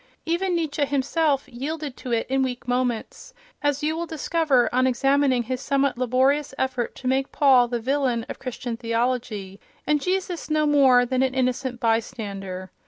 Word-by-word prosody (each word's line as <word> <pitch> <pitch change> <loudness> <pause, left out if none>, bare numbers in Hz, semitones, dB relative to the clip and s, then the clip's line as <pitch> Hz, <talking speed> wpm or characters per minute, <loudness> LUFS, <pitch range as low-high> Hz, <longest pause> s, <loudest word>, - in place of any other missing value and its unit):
Even 350 +2 0
Nietzsche 310 -3 -1
himself 280 +1 0
yielded 285 +2 -5
to 250 - -7
it 230 -1 +1
in 270 +1 +1
weak 250 -2 -3
moments, 250 - -2 0.3
as 290 0 0
you 310 +1 0
will 340 +1 -3
discover 310 -5 +1
on 255 +1 +3
examining 270 0 +2
his 255 +2 -4
somewhat 275 0 +1
laborious 260 +4 +1
effort 255 -3 -2
to 255 - -6
make 265 +1 0
Paul 260 -4 +5
the 240 0 -2
villain 250 -2 0
of - - -7
Christian 250 -2 -5
theology, 230 -4 -2 0.3
and 300 -1 +2
Jesus 365 -1 -2
no 305 0 +2
more 270 -4 +5
than 255 +1 0
an 260 0 0
innocent 255 -1 -1
bystander. 200 -5 -2
260 Hz, 165 wpm, -24 LUFS, 245-290 Hz, 0.3 s, Paul